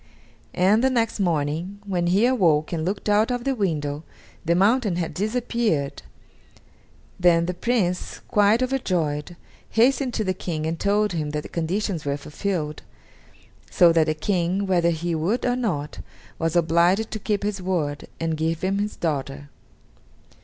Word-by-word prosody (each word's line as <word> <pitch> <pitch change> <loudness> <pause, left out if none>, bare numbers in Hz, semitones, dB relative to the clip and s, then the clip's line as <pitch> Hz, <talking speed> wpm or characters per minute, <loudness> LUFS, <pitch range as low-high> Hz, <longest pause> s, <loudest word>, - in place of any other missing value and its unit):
And 200 +6 +3
the 265 - +4
next 230 -4 0
morning, 170 +2 -1
when 180 -3 -1
he 195 +6 +3
awoke 175 -12 +2
and 160 -2 -1
looked 195 +5 -3
out 210 +2 +3
of 245 -1 -2
the 275 - 0
window, 155 - -2 0.4
the 170 0 +2
mountain 205 +1 +3
had 170 -2 -2
disappeared! 215 - -1 1.2
Then 170 -2 +4
the 180 - -2
Prince, 180 -2 -1
quite 210 +4 +3
overjoyed, 175 - -1 0.3
hastened 250 +2 +2
to 220 - 0
the 185 -2 0
King 165 -4 -4
and 160 +1 -2
told 205 +1 +2
him 155 -3 -2
that 150 0 -3
the - - -9
conditions 175 +1 -2
were 140 0 -1
fulfilled, 150 +1 -3 0.9
so 170 -1 +5
that 165 -1 +3
the 155 - 0
King, 180 +3 0
whether 175 -3 +2
he 170 +1 -2
would 170 +10 0
or 245 0 +2
not, 180 -13 -3 0.4
was 165 0 -1
obliged 175 +6 +3
to 215 - -4
keep 205 -1 -1
his 205 -2 -2
word 160 -6 -2
and 165 -1 -1
give 160 +1 -1
him 195 +1 0
his 210 +1 -2
daughter. 145 -3 -3
180 Hz, 160 wpm, -24 LUFS, 160-210 Hz, 1.2 s, so